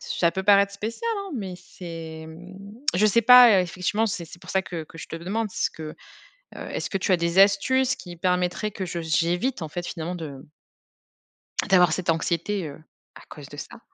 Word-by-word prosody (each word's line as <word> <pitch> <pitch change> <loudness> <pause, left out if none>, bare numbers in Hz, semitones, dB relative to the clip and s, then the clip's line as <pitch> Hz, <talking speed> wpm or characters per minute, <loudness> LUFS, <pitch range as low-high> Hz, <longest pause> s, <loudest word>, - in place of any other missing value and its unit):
Ça 170 -1 0
peut 190 +2 -4
paraître 200 0 +5
spécial, 225 - -4
hein, 395 -2 -6
mais 195 -6 -4
c'est, 165 -3 -9
mmh 175 +4 -12 0.4
je 190 +4 +3
sais 215 +2 +4
pas, 240 -3 +8
effectivement, 185 +5 -1
c'est 180 -4 -3
c'est 170 - -13
pour - - -15
ça 190 0 +1
que 165 -4 -6
que 165 - -15
je - - -9
te - - -5
demande 205 +6 -3
ce - - -1
que, 160 - -10 0.7
heu, - - -9
est-ce - - -3
que 195 - -1
tu 190 0 +1
as - - +4
des 170 +2 +1
astuces 245 +7 +4
qui 175 -1 -10
permettraient 180 +4 0
que 190 -2 -5
je 170 -1 -4
j'évite 175 +9 0
en 160 - -4
fait 175 +3 -5
finalement 170 +2 -4
de 145 -5 -8 1.3
d'avoir 180 -4 +5
cette 175 0 0
anxiété, 170 +4 -1
heu, 145 +2 -11 0.4
à - - -12
cause - - -11
de - - -11
ça? - - -9
180 Hz, 200 wpm, -25 LUFS, 170-205 Hz, 1.3 s, pas